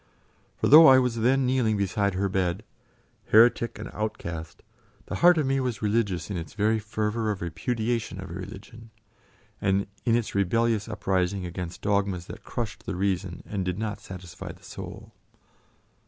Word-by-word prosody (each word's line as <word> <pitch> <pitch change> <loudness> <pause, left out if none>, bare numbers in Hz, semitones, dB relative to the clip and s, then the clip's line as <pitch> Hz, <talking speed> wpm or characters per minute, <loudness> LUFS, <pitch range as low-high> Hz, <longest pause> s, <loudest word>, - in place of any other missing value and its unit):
For - - +1
though 160 +3 +10
I 130 -1 +9
was 125 -2 +1
then 130 +4 +3
kneeling 125 -4 +2
beside 100 0 0
her 100 +2 +1
bed, 95 +1 -1 0.6
heretic 115 +1 +4
and - - -6
outcast, 85 -7 -5 0.4
the - - -4
heart 175 0 +6
of 155 - +2
me 135 0 +1
was 125 -5 -2
religious 105 -3 0
in 95 - -2
its 85 +4 -7
very 110 +1 +2
fervour 110 +1 -2
of 100 -3 -2
repudiation 110 +5 -2
of 95 -1 -7
a - - -6
religion, 110 +5 -9 0.7
and 100 0 +1 0.2
in 115 -2 +3
its 120 -2 -1
rebellious 110 +3 +1
uprising 95 -2 -1
against 90 0 -6
dogmas 100 -3 0
that - - -10
crushed 115 -1 -5
the 100 - -2
reason 95 -1 -2
and 100 -2 -3
did 90 0 -2
not 105 -1 -3
satisfy 90 -2 -8
the - - -17
soul. - - -9
105 Hz, 165 wpm, -26 LUFS, 95-115 Hz, 0.7 s, though